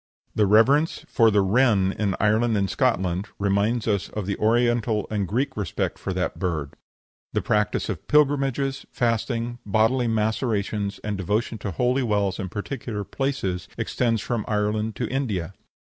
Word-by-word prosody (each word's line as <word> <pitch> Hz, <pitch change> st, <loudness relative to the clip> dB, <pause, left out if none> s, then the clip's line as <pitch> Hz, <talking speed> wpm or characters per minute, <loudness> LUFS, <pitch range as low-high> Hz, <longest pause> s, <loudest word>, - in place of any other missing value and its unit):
The 105 Hz, -2 st, +2 dB
reverence 135 Hz, -, +4 dB
for 115 Hz, -2 st, +4 dB
the 105 Hz, -1 st, +3 dB
wren 100 Hz, -2 st, +3 dB
in 100 Hz, -1 st, -1 dB
Ireland 110 Hz, +2 st, +2 dB
and 100 Hz, -1 st, +1 dB
Scotland 95 Hz, +2 st, 0 dB
reminds 100 Hz, +4 st, +1 dB
us 100 Hz, -4 st, 0 dB
of 105 Hz, -3 st, -4 dB
the 100 Hz, +1 st, -1 dB
Oriental 115 Hz, -1 st, +2 dB
and 100 Hz, -3 st, -1 dB
Greek 130 Hz, +7 st, -1 dB
respect 100 Hz, -6 st, -2 dB
for 95 Hz, -, -4 dB
that 90 Hz, 0 st, -2 dB
bird. 80 Hz, -7 st, -2 dB, 0.6 s
The -, -, +1 dB
practice 105 Hz, 0 st, +1 dB
of 95 Hz, -7 st, -5 dB
pilgrimages, 140 Hz, -2 st, +1 dB
fasting, 120 Hz, 0 st, -1 dB
bodily 115 Hz, +5 st, +2 dB
macerations, 105 Hz, -2 st, -1 dB
and 105 Hz, -2 st, -3 dB
devotion 105 Hz, +4 st, -1 dB
to 100 Hz, -, -4 dB
holy 125 Hz, +7 st, +1 dB
wells 100 Hz, -5 st, 0 dB
and 95 Hz, -2 st, -3 dB
particular 105 Hz, +1 st, -4 dB
places, 100 Hz, -6 st, -2 dB
extends 115 Hz, -1 st, 0 dB
from 115 Hz, -3 st, -2 dB
Ireland 105 Hz, +1 st, 0 dB
to 120 Hz, -, -2 dB
India. 105 Hz, -10 st, -2 dB
110 Hz, 150 wpm, -24 LUFS, 100-120 Hz, 0.6 s, reverence